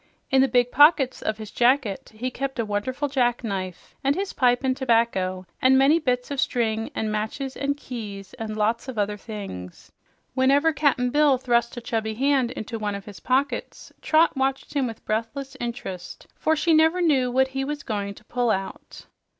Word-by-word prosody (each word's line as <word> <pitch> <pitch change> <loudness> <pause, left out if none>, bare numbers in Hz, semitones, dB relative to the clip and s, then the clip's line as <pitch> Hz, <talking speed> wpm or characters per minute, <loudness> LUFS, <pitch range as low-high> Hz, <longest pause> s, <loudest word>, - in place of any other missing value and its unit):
In 265 0 +5
the 270 - +4
big 245 0 +2
pockets 290 -2 +5
of 215 - -2
his 215 -2 -8
jacket 245 -4 +1
he 240 +4 -4
kept 270 +1 -4
a 230 - 0
wonderful 255 +8 -2
jackknife, 230 -9 -2
and 275 +1 +2
his 390 +2 -3
pipe 245 0 +2
and 260 -1 +1
tobacco, 225 -8 +1 0.2
and 260 +1 +5
many 280 +5 +5
bits 250 -3 -1
of 280 - -3
string, 225 -2 0
and 215 -1 -1
matches 220 +6 -3
and 280 0 -1
keys 205 -8 -8
and 215 -1 -4
lots 225 +4 0
of 260 -3 -6
other 205 0 0
things. 195 - -8 0.4
Whenever 275 +5 +3
Cap'n 270 -4 +1
Bill 290 -2 +4
thrust 240 -1 0
a - - -4
chubby 220 -2 -2
hand 270 0 +2
into 230 -3 -6
one 205 -1 -2
of 200 0 -8
his 205 -3 -10
pockets, 270 +3 -2
Trot 320 0 +3
watched 270 0 -1
him 275 -3 +1
with 225 -1 -9
breathless 230 +6 -3
interest, 215 -7 -6
for 315 - +1
she 325 +2 +2
never 320 +3 +4
knew 280 -8 +3
what 265 +2 +2
he 270 0 -3
was 290 +1 -4
going 200 -2 -3
to - - -16
pull 245 0 0
out. 195 -2 -4
245 Hz, 185 wpm, -24 LUFS, 215-275 Hz, 0.4 s, In